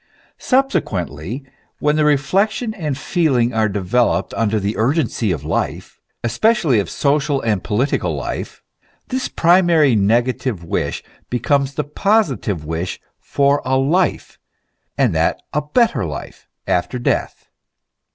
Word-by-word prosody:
Subsequently, 110 - -1 0.3
when 150 +1 +1
reflection 185 - +1
and 150 -9 -3
feeling 135 -8 +1
are 110 -1 +2
developed 105 +5 0
under 110 -1 0
the 100 +2 -2
urgency 120 - 0
of 75 -5 -3
life, 80 +2 -3 0.2
especially 150 - +2
of 95 - -2
social 145 -1 +1
and 105 -5 0
political 125 +7 0
life, - - -5 0.5
this 260 0 -1
primary 170 -6 +4
negative 115 -1 +1
wish 85 - -2 0.3
becomes 135 +3 0
the 150 - -1
positive 145 - 0
wish 80 +3 -3 0.2
for 140 0 +1
a 130 +1 +1
life, 165 +8 0 0.6
and - - +2
that - - +1
a 150 - +1
better 215 - +1
life, 75 -4 -7 0.2
after 90 +8 0
death. 120 - -2
135 Hz, 120 wpm, -19 LUFS, 105-155 Hz, 0.6 s, primary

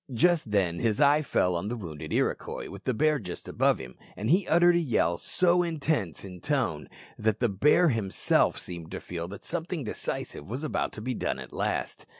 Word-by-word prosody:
Just 170 -1 +3
then 90 -5 +1
his 110 -3 +1
eye 145 +1 +5
fell 90 -11 +1
on 85 +4 -2
the 120 - -2
wounded 80 -8 -7
Iroquois - - -1
with 100 0 -10
the 130 - +1
bear 155 +1 +2 0.3
above - - +2
him, 65 -1 -9 0.2
and 110 +7 -1
he 185 +2 +3
uttered 175 +1 +5
a - - +4
yell 115 - +1
so 180 -1 +2
intense 150 - -1
in 90 -2 -9
tone 130 - -1 0.3
that 110 0 +1
the 120 - +2
bear 150 - +4
himself 110 -7 +2
seemed 85 -2 -7
to - - -3
feel 85 -1 -5
that 100 +3 -10
something 170 -2 -3
decisive 100 -7 -4
was 130 +7 -4
about 155 - -1
to 105 - -7
be 125 +3 -2
done - - -2
at - - -9
last. - - -2
115 Hz, 195 wpm, -28 LUFS, 95-155 Hz, 0.3 s, eye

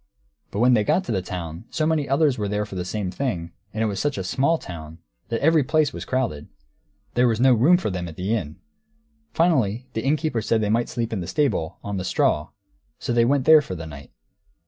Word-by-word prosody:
But - - -6
when 125 +1 +5
they 110 -3 +3
got 185 - +2
to - - -4
the 95 -4 0
town, 85 +1 -6
so 155 -2 -1
many 155 -3 0
others 140 0 +3
were 105 -3 -2
there 105 +1 -1
for 105 - -12
the 90 -1 -3
same 95 0 -3
thing, 90 -10 -3 0.2
and 110 +1 -2
it - - +2
was 100 -3 -2
such 145 -4 -1
a 95 - -2
small 140 - +1
town, 80 - -9 0.3
that 115 -1 -2
every 160 -1 +5
place 155 +2 +1
was - - -6
crowded. 120 - -2 0.7
There 125 0 +3
was 115 -2 +1
no 130 +1 +6
room 140 +10 +5
for 175 - -2
them 90 -1 -4
at 80 - -9
the 95 +6 -2
inn. 80 -8 -4 0.8
Finally, 130 - +1
the 110 - -2
innkeeper 145 -3 0
said 110 +1 +1
they 105 -1 0
might 115 +2 +1
sleep 115 -1 -3
in 105 - -1
the 85 - -5
stable, 135 - 0
on 100 -1 -3
the 95 - -3
straw. 75 -4 +1 0.5
So - - -3
they 120 -1 +4
went 135 +1 +2
there 155 -1 +8
for 95 -10 -6
the 80 -2 -7
night. 70 -3 -10
115 Hz, 235 wpm, -23 LUFS, 90-140 Hz, 0.8 s, there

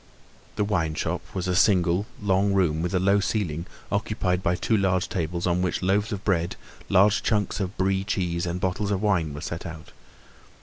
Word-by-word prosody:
The 105 - +1
wine 85 -7 0
shop 85 +2 -2
was 95 -1 -2
a 90 - +1
single, 90 0 +3
long 100 0 +2
room 85 -5 +2
with 90 +2 -1
a - - +3
low 100 +2 +3
ceiling 90 -5 -2 0.2
occupied 100 -3 0
by 90 -1 +1
two 110 - 0
large 95 -3 +1
tables 85 0 -2
on 90 0 +1
which 90 0 -1
loaves 100 +4 +1
of 100 -2 -4
bread, 85 -4 0 0.3
large 100 +3 +4
chunks 105 -3 0
of 95 -1 -3
Brie 95 0 +1
cheese 90 -4 -1
and 85 +1 -2
bottles 95 +3 -1
of 100 -2 0
wine 90 -7 +1
were 70 0 -7
set 85 0 -5
out. 80 -2 -9
95 Hz, 190 wpm, -25 LUFS, 85-100 Hz, 0.3 s, large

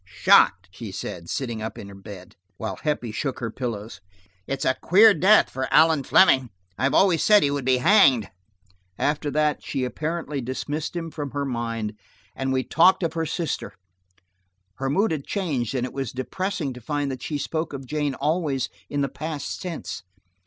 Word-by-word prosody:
"Shot!" 90 0 +4
she 105 +1 -8
said, 85 -2 -6
sitting 120 -5 -3
up 110 - -5
in 100 -1 -10
bed, 95 -3 -11 0.2
while 110 - -4
Heppie 145 -7 -2
shook 135 +4 -3
her 115 -3 -3
pillows. 110 -6 -5 0.5
"It's 135 -1 -3
a 130 - +3
queer 210 +5 +7
death 190 +6 +5
for 130 0 -4
Allan 160 -2 +5
Fleming; 135 -5 +4 0.3
I 130 - +1
always 180 0 +3
said 210 -4 +6
he 140 - +2
would 140 -3 -3
be 130 -1 +3
hanged." 135 - +5 0.7
After 150 0 0
that, 150 +1 +1
she 135 - -3
apparently 150 +2 -3
dismissed 145 +6 -4
him 165 -1 -4
from 145 -2 -5
her 140 -1 -2
mind, 115 -4 -4 0.4
and 135 0 -2
we 130 0 +1
talked 180 +6 +4
of 165 -2 -1
her 165 -1 -2
sister. 165 +1 -3 1.0
Her 135 0 -2
mood 195 +9 +2
had 150 -4 -4
changed 140 - -2
and 125 -1 0
it 125 - -7
was 135 -4 -3
depressing 155 +3 -3
to 125 - -11
find 145 +3 -2
that 130 -2 -6
she 150 - -3
spoke 160 +3 -3
of 135 -2 -7
Jane 145 0 -2
always 150 -5 -1 0.2
in 145 - -1
the 140 - +1
past 155 +2 -5
tense. 170 - -5
140 Hz, 180 wpm, -24 LUFS, 125-160 Hz, 1.0 s, queer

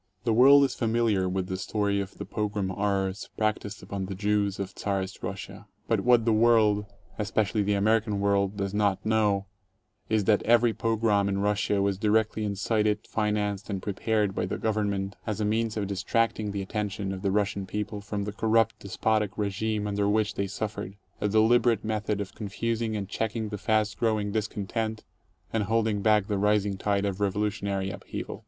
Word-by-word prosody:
The 115 - +2
world 140 +5 +7
is 135 - +1
familiar 110 -5 +1
with 95 0 -1
the 95 0 -4
story 100 +1 0
of 95 -1 -8
the - - -5
pogrom 105 -2 -2
horrors 95 0 -1
prac 110 -1 +1
ticed 105 +1 -9
upon 95 -2 -4
the 95 - -5
Jews 100 0 0
of 95 0 -4
Czarist 95 -2 -3
Russia. - - -7 0.2
But - - +2
what 120 -2 +4
the 115 - +3
world, 110 -2 +4 0.3
espe* 105 +1 -3
13 110 - +4
cially 105 +1 0
the 105 0 +2
American 105 0 +2
world, 100 0 +1
does 100 -1 -2
not 100 -2 +1
know 105 -3 +2 0.6
is 110 -2 +2
that 105 +1 +3
every 120 0 +4
pogrom 110 -3 +1
in 95 - 0
Russia 100 0 +1
was 100 -1 0
directly 110 +1 +1
incited, 105 +1 0
financed, 105 -2 -1
and 100 -2 -2
prepared 105 +1 0
by 90 - -1
the - - -3
Gov 110 - 0
ernment 100 -1 -2
as 110 -1 -2
a 105 - 0
means 110 +1 0
of 105 - -1
distracting 105 +3 0
the 100 -1 -3
attention 100 -1 -3
of 95 - -6
the 100 - 0
Russian 100 -1 0
people 105 +1 -4
from 100 0 -3
the 105 +1 -4
corrupt 110 +1 +2
despotic 105 +1 -1
regime 105 +1 -1
under 100 0 0
which 110 0 +1
they 100 +1 -2
suffered 100 -1 -5
— - - -35
a 105 - +2
deliberate 110 +1 +3
method 105 -1 -1
of 100 -2 -5
confusing 110 +2 -2
and 100 -2 -4
checking 110 +1 -2
the 105 - -4
fast 110 0 0
growing 110 -3 +1
dis 110 0 0
content 110 +2 -3 0.5
and 110 -2 +1
holding 110 -2 +1
back 105 -1 +3
the 105 -1 -1
rising 105 -1 +2
tide 100 +1 0
of 100 -1 -2
revolutionary 100 -1 -1
upheaval. - - -6
105 Hz, 190 wpm, -27 LUFS, 100-110 Hz, 0.6 s, world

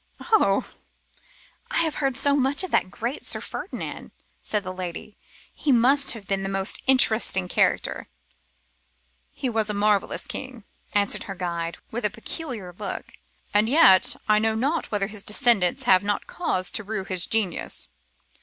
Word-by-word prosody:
'Oh! 445 -2 +2 1.0
I - - +1
have 320 -2 -1
heard 270 -2 0
so 280 +1 +4
much 275 +4 +2
of 375 - -5
that - - +2
great 235 +9 -5
Sir - - +4
Ferdinand,' - - -7 0.3
said 210 -2 -1
the 185 0 -5
lady. 185 +2 -7 0.4
'He 295 - -1
must 265 +3 +4
have 220 -4 -10
been 195 0 -1
the 195 - -3
most 195 +1 +1
interesting 220 -7 +4
character.' - - 0 1.2
'He 270 - -4
was 220 -3 0
a 210 - -2
marvellous 205 -1 +1
being,' 255 -4 -7 0.3
answered 200 -1 +1
her 195 - -6
guide, 170 -2 -4
with 240 +2 -4
a 210 - +2
peculiar 220 - -5
look, 200 -3 -6 0.4
'and 210 +2 +3
yet 260 - +6
I 210 0 +4
know 220 0 +1
not 285 +8 -1
whether 205 -2 0
his 205 0 -4
descendants 210 -5 +2
have 185 -1 +5
not 205 0 -2
cause 185 - -2
to 220 - -3
rue 210 -1 -3
his 185 -2 0
genius. 215 -6 -2
215 Hz, 160 wpm, -24 LUFS, 195-260 Hz, 1.2 s, yet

